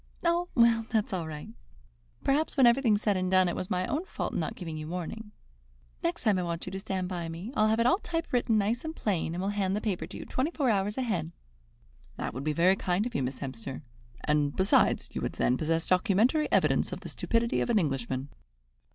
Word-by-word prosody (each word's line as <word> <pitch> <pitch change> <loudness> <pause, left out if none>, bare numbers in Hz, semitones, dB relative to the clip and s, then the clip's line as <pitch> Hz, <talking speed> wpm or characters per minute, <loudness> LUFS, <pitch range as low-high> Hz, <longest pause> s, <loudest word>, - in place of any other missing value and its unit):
"Oh, 345 +1 +1
well, 230 -2 +4
that's 215 -3 0
all 170 -4 -2
right. 150 -1 -7 0.7
Perhaps, 295 +3 +1
when 265 - +7
everything's 235 -3 +4
said 205 -2 +2
and 185 0 0
done, 185 -1 +5
it 175 - -1
was 185 - -4
my 185 0 0
own 300 - -1
fault - - -4
in - - -1
not - - -2
giving 165 -4 -6
you 155 0 -5
warning. 180 +6 -5 0.7
Next 340 0 -2
time 210 -5 +3
I - - 0
want 170 -1 -3
you - - -6
to 190 - -4
stand 190 -2 -3
by 175 -3 -4
me, 175 +10 -7
I'll 215 0 +4
have 220 +1 +2
it 230 - +3
all 365 +10 +4
typewritten 325 - 0
nice 215 +4 0
and 320 0 -5
plain, 170 -5 -1
and 180 - -2
will 195 - 0
hand 195 -2 0
the - - 0
paper 205 -5 -2
to - - -9
you - - -7
twenty 260 +5 -1
four 280 -8 +1
hours 205 +1 0
ahead." 190 -11 -1 0.9
"That - - -3
would 130 +4 -5
be 155 - 0
very 175 +5 +4
kind 190 +2 0
of 245 - -4
you, - - 0
Miss 130 +1 -3
Hemster; 130 +1 -6 0.4
and, 150 -1 +1
besides, 190 +1 +3
you - - -3
would - - -2
then 125 - +2
possess 165 +4 0
documentary 215 - +2
evidence - - +3
of - - -5
the - - -7
stupidity 230 0 0
of - - -1
an 235 - +3
Englishman." 135 - -1
195 Hz, 230 wpm, -29 LUFS, 165-235 Hz, 0.9 s, when